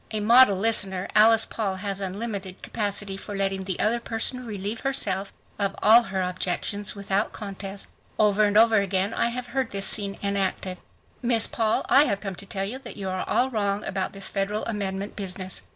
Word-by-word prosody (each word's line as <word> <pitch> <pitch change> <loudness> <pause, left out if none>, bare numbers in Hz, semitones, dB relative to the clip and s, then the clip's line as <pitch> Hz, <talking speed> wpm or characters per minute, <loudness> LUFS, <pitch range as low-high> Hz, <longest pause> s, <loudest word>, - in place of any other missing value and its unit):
A 215 - -2
model 230 -1 +6
listener, 195 -3 +1
Alice 225 +1 +6
Paul 200 -4 -3
has 200 0 -4
unlimited 195 -1 -5
capacity 205 -2 -2
for 205 +1 -7
letting 195 -1 -1
the 185 -2 -3
other 230 +3 +2
person 235 +2 -3
relieve 205 +1 -4
herself 200 -8 0 0.3
of 200 -1 0
all 230 +3 +8
her 195 -4 -3
objections 185 +3 -2
without 200 +1 -1
contest. 200 -1 -7 0.3
Over 210 -1 +3
and 205 0 +2
over 225 0 +6
again 195 +1 0
I - - +1
have 245 +1 -4
heard 255 0 -2
this 195 0 -1
scene 200 -2 +3
enacted. 195 -2 -2 0.4
"Miss 235 -3 +3
Paul, 220 -2 0
I 285 +2 +6
have 200 -8 -1
come 195 -1 -5
to 200 - -10
tell 195 0 -3
you 245 +7 -5
that 240 -5 -10
you 195 -2 -4
are 185 0 -4
all 260 +1 +2
wrong 205 -2 -1
about 190 -1 -3
this 195 -1 -4
federal 205 +2 -1
amendment 200 -2 -3
business. 185 -1 -5
200 Hz, 185 wpm, -25 LUFS, 195-225 Hz, 0.4 s, all